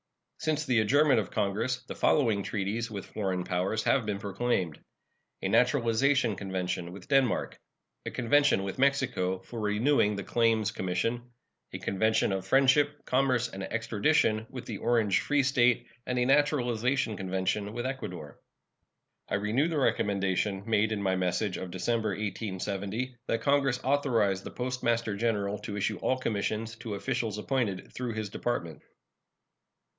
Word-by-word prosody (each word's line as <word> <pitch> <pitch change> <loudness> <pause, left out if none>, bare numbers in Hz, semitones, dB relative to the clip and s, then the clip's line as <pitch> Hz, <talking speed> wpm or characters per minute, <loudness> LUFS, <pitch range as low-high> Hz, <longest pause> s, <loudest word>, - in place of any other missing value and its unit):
Since 155 -1 -1
the 125 -5 +3
adjournment 140 +4 +4
of 105 - -3
Congress 110 +5 -1
the - - -7
following 115 -9 +2
treaties 105 +4 -2
with 100 -3 -6
foreign 95 -3 -2
powers 90 +5 -1
have 135 - +3
been 105 -2 -1
proclaimed: 100 -5 -1 0.6
A - - +1
naturalization 125 -1 +3
convention 90 -3 -3
with 90 0 -11
Denmark; 135 -3 +1 0.5
a - - 0
convention 130 -3 +3
with 100 +5 -5
Mexico 130 -9 +1
for 115 +5 -9
renewing 105 +1 +2
the 100 - -4
Claims 115 0 +2
Commission; 115 +7 -2 0.4
a - - -5
convention 110 +2 +1
of 95 0 -3
friendship, 140 +4 +3
commerce, 130 -2 +2
and 95 -3 -7
extradition 110 +2 +1
with 125 -2 -8
the 110 -4 -5
Orange 115 -5 +2
Free 145 -1 +1
State, 125 -3 +3 0.2
and 125 - -1
a 125 - +2
naturalization 130 -4 +2
convention 95 +2 -2
with 120 +2 -4
Ecuador. 105 - -6 0.9
I - - 0
renew 105 +9 +1
the 165 -2 -2
recommendation 100 -5 0
made 110 -1 +2
in 105 -2 -2
my 95 -1 +1
message 95 +2 -1
of 95 - -6
December, 110 +5 -1
1870, 100 +3 -3
that 115 - 0
Congress 140 -2 +2
authorize 120 -8 +2
the - - -7
Postmaster 120 -3 -1
General 105 -2 -1
to 105 -1 -6
issue 100 - -1
all 130 - +1
commissions 110 -1 -2
to 110 -2 -5
officials 110 +1 -2
appointed 105 -5 -2
through 125 -2 -3
his 110 -2 -4
Department. 85 - -3
110 Hz, 145 wpm, -29 LUFS, 100-125 Hz, 0.9 s, adjournment